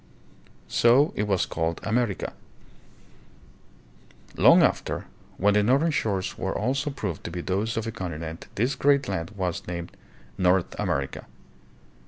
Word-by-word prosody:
So 125 Hz, +6 st, +4 dB
it 105 Hz, -, -1 dB
was 95 Hz, -4 st, +2 dB
called 80 Hz, 0 st, -2 dB
"America." 110 Hz, -2 st, -1 dB, 2.0 s
Long -, -, +7 dB
after, -, -, 0 dB, 0.3 s
when 105 Hz, +2 st, +3 dB
the 105 Hz, -, +4 dB
northern 135 Hz, +10 st, +3 dB
shores 100 Hz, -9 st, -1 dB
were -, -, -2 dB
also 135 Hz, +6 st, 0 dB
proved 105 Hz, -, -4 dB
to -, -, -3 dB
be 90 Hz, +1 st, -5 dB
those 100 Hz, +6 st, -1 dB
of 115 Hz, -, -1 dB
a 115 Hz, -, -3 dB
continent/this 90 Hz, -, -4 dB
great 140 Hz, -2 st, +2 dB
land 85 Hz, -4 st, -3 dB
was 90 Hz, -3 st, -3 dB
named 85 Hz, -1 st, -5 dB, 0.5 s
"North 90 Hz, -1 st, +2 dB
America." 70 Hz, 0 st, -2 dB
100 Hz, 130 wpm, -26 LUFS, 90-120 Hz, 2.0 s, Long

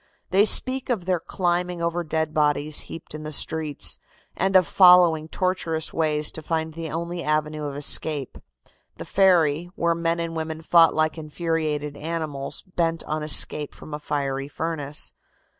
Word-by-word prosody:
They 195 Hz, +3 st, +5 dB
speak 255 Hz, +4 st, +3 dB
of 215 Hz, -8 st, -1 dB
their 180 Hz, -2 st, 0 dB
climbing 175 Hz, 0 st, -2 dB
over 170 Hz, +1 st, -1 dB
dead 160 Hz, -1 st, -2 dB
bodies 150 Hz, 0 st, +2 dB
heaped 165 Hz, -, -9 dB
in 155 Hz, -, -7 dB
the 155 Hz, 0 st, -6 dB
streets, 155 Hz, 0 st, 0 dB, 0.4 s
and 190 Hz, +1 st, 0 dB
of 185 Hz, -2 st, +6 dB
following 175 Hz, -4 st, +5 dB
tortuous 165 Hz, -3 st, -2 dB
ways 150 Hz, -2 st, 0 dB
to 160 Hz, -, -6 dB
find 160 Hz, 0 st, -3 dB
the 165 Hz, 0 st, -6 dB
only 170 Hz, +2 st, -4 dB
avenue 155 Hz, 0 st, -1 dB
of 140 Hz, -1 st, -5 dB
escape 145 Hz, -1 st, 0 dB, 0.6 s
the -, -, -7 dB
ferry, 175 Hz, -4 st, +2 dB
where 170 Hz, 0 st, +1 dB
men 165 Hz, 0 st, -1 dB
and 165 Hz, 0 st, -4 dB
women 160 Hz, 0 st, -5 dB
fought 165 Hz, 0 st, +5 dB
like 155 Hz, +1 st, 0 dB
infuriated 155 Hz, -2 st, -3 dB
animals, 155 Hz, -3 st, -3 dB
bent 165 Hz, -3 st, -2 dB
on 155 Hz, 0 st, -3 dB
escape 150 Hz, -1 st, +3 dB
from 155 Hz, -, -11 dB
a 150 Hz, -, -4 dB
fiery 140 Hz, -2 st, -3 dB
furnace. 150 Hz, -1 st, -2 dB
160 Hz, 160 wpm, -24 LUFS, 150-170 Hz, 0.6 s, of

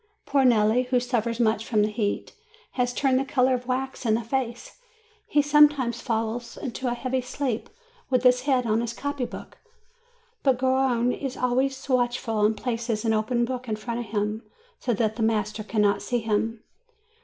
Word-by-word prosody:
Poor 280 Hz, -1 st, +2 dB
Nelli, 235 Hz, 0 st, +3 dB
who 250 Hz, -1 st, +2 dB
suffers 235 Hz, -2 st, -1 dB
much 220 Hz, -2 st, +2 dB
from 215 Hz, -2 st, +1 dB
the 210 Hz, -, 0 dB
heat, 210 Hz, -1 st, -2 dB, 0.4 s
has 245 Hz, -1 st, 0 dB
turned 260 Hz, 0 st, +2 dB
the -, -, 0 dB
color 260 Hz, -1 st, +2 dB
of 250 Hz, -1 st, -3 dB
wax 265 Hz, +1 st, -2 dB
in 220 Hz, -3 st, +2 dB
the 230 Hz, -, -2 dB
face; 240 Hz, -, -4 dB, 0.5 s
he 290 Hz, -, +3 dB
sometimes 290 Hz, -4 st, +4 dB
falls 230 Hz, 0 st, -3 dB
into 260 Hz, +1 st, -4 dB
a 240 Hz, -, 0 dB
heavy 255 Hz, +1 st, -1 dB
sleep, 250 Hz, -2 st, -3 dB, 0.4 s
with 255 Hz, -2 st, +2 dB
his 250 Hz, 0 st, +5 dB
head 260 Hz, -2 st, +1 dB
on 220 Hz, 0 st, +1 dB
his 235 Hz, -1 st, -3 dB
copy 285 Hz, -2 st, -3 dB
book. -, -, -10 dB, 0.8 s
But 265 Hz, -3 st, +3 dB
Garrone 260 Hz, -2 st, +2 dB
is 270 Hz, -2 st, -5 dB
always 260 Hz, +2 st, 0 dB
watchful, 240 Hz, -4 st, 0 dB
and 215 Hz, +1 st, +3 dB
places 230 Hz, -2 st, -2 dB
an 225 Hz, -, +2 dB
open 235 Hz, +2 st, +1 dB
book 250 Hz, -1 st, -5 dB
in 215 Hz, -, 0 dB
front 230 Hz, +2 st, -4 dB
of 240 Hz, -, -5 dB
him, 210 Hz, +1 st, -2 dB, 0.4 s
so 250 Hz, -, -1 dB
that 220 Hz, 0 st, 0 dB
the -, -, -3 dB
master 215 Hz, -1 st, 0 dB
can 215 Hz, 0 st, 0 dB
not 200 Hz, -1 st, +2 dB
see 245 Hz, -, -1 dB
him. 225 Hz, 0 st, -1 dB
240 Hz, 185 wpm, -25 LUFS, 220-260 Hz, 0.8 s, his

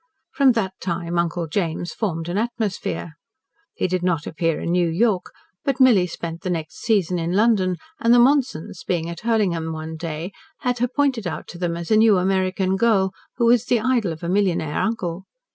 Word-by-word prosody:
From 275 Hz, -4 st, +5 dB
that 195 Hz, -5 st, -1 dB
time 170 Hz, -1 st, -2 dB
Uncle 170 Hz, 0 st, -1 dB
James 170 Hz, 0 st, -2 dB
formed 165 Hz, -7 st, -3 dB
an 175 Hz, -, -3 dB
atmosphere. 215 Hz, -7 st, -2 dB, 0.6 s
He -, -, 0 dB
did 185 Hz, 0 st, -1 dB
not 170 Hz, -4 st, 0 dB
appear 165 Hz, -1 st, -1 dB
in 170 Hz, -, -2 dB
New 175 Hz, -1 st, +2 dB
York, 190 Hz, +2 st, +1 dB, 0.3 s
but 275 Hz, -2 st, -1 dB
Milly 230 Hz, -9 st, +5 dB
spent 170 Hz, -1 st, -6 dB
the 185 Hz, -, -3 dB
next 160 Hz, -3 st, -3 dB
season 190 Hz, -6 st, +1 dB
in 170 Hz, +1 st, -2 dB
London, 200 Hz, -3 st, +3 dB, 0.2 s
and 230 Hz, -, +2 dB
the 245 Hz, -, +7 dB
Monsons, 240 Hz, -, +2 dB
being 170 Hz, -2 st, -1 dB
at 170 Hz, -, -7 dB
Hurlingham 190 Hz, -8 st, 0 dB
one 160 Hz, 0 st, -6 dB
day, 165 Hz, +2 st, -5 dB, 0.3 s
had 250 Hz, -2 st, -1 dB
her 245 Hz, -, +2 dB
pointed 255 Hz, -5 st, 0 dB
out 170 Hz, -, -5 dB
to 175 Hz, -, -9 dB
them 170 Hz, -2 st, -1 dB
as 170 Hz, +2 st, -6 dB
a 215 Hz, -, +6 dB
new 220 Hz, -2 st, +5 dB
American 190 Hz, 0 st, +1 dB
girl, 195 Hz, -3 st, +3 dB, 0.3 s
who 235 Hz, -, +2 dB
was 235 Hz, 0 st, +4 dB
the 245 Hz, -1 st, +2 dB
idol 235 Hz, -5 st, +1 dB
of 160 Hz, +1 st, -8 dB
a -, -, -2 dB
millionaire 180 Hz, -5 st, +1 dB
uncle. 190 Hz, -5 st, -2 dB
185 Hz, 195 wpm, -22 LUFS, 170-225 Hz, 0.6 s, the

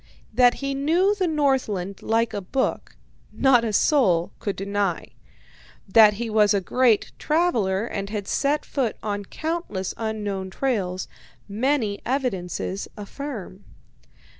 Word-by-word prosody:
That 245 Hz, +1 st, +5 dB
he 275 Hz, 0 st, -3 dB
knew 330 Hz, +9 st, +2 dB
the 385 Hz, -3 st, 0 dB
Northland 255 Hz, -, 0 dB
like 225 Hz, 0 st, +1 dB
a 205 Hz, -, -3 dB
book, 260 Hz, +8 st, -2 dB, 0.4 s
not 265 Hz, -3 st, +4 dB
a 225 Hz, -, -1 dB
soul 195 Hz, -, +3 dB
can 200 Hz, -, -3 dB
deny. 200 Hz, -2 st, -2 dB, 0.8 s
That 210 Hz, +1 st, +6 dB
he 235 Hz, +3 st, -3 dB
was 210 Hz, -1 st, +3 dB
a -, -, +3 dB
great 230 Hz, +3 st, +2 dB
traveller, 230 Hz, -, +1 dB
and 200 Hz, -4 st, -4 dB
had 205 Hz, -2 st, -4 dB
set 290 Hz, +2 st, 0 dB
foot 255 Hz, -6 st, -2 dB
on 205 Hz, -1 st, -3 dB
countless 315 Hz, -, -3 dB
unknown 210 Hz, -4 st, -3 dB
trails, 185 Hz, -6 st, -2 dB, 0.4 s
many 220 Hz, -1 st, 0 dB
evidences 200 Hz, -7 st, -2 dB
affirm. 210 Hz, -3 st, -7 dB
220 Hz, 125 wpm, -24 LUFS, 200-270 Hz, 0.8 s, That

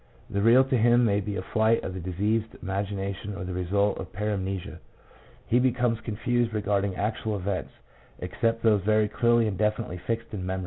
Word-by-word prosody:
The 100 Hz, -, 0 dB
real 120 Hz, +5 st, +6 dB
to 135 Hz, -1 st, 0 dB
him 120 Hz, +2 st, +5 dB
may 100 Hz, -2 st, +2 dB
be 105 Hz, 0 st, -4 dB
a 95 Hz, -, -3 dB
flight 110 Hz, +2 st, +2 dB
of 95 Hz, -, -4 dB
the 95 Hz, -, -5 dB
diseased 105 Hz, +5 st, -1 dB
imagination 100 Hz, +1 st, -3 dB
or 100 Hz, -, -5 dB
the 90 Hz, 0 st, -5 dB
result 100 Hz, +3 st, 0 dB
of 95 Hz, -1 st, -7 dB
paramnesia. 95 Hz, -2 st, -3 dB, 0.7 s
He 120 Hz, -, +3 dB
becomes 125 Hz, -2 st, +1 dB
confused 120 Hz, +1 st, -1 dB
regarding 100 Hz, -2 st, 0 dB
actual 105 Hz, +2 st, -2 dB
events, 95 Hz, 0 st, -3 dB, 0.5 s
except 115 Hz, 0 st, -1 dB
those 105 Hz, -3 st, +4 dB
very 110 Hz, +2 st, +3 dB
clearly 120 Hz, +2 st, +3 dB
and 95 Hz, -3 st, -3 dB
definitely 105 Hz, -4 st, -1 dB
fixed 115 Hz, 0 st, -3 dB
in 95 Hz, -3 st, -4 dB
memory. 95 Hz, +1 st, -2 dB
105 Hz, 180 wpm, -27 LUFS, 95-115 Hz, 0.7 s, real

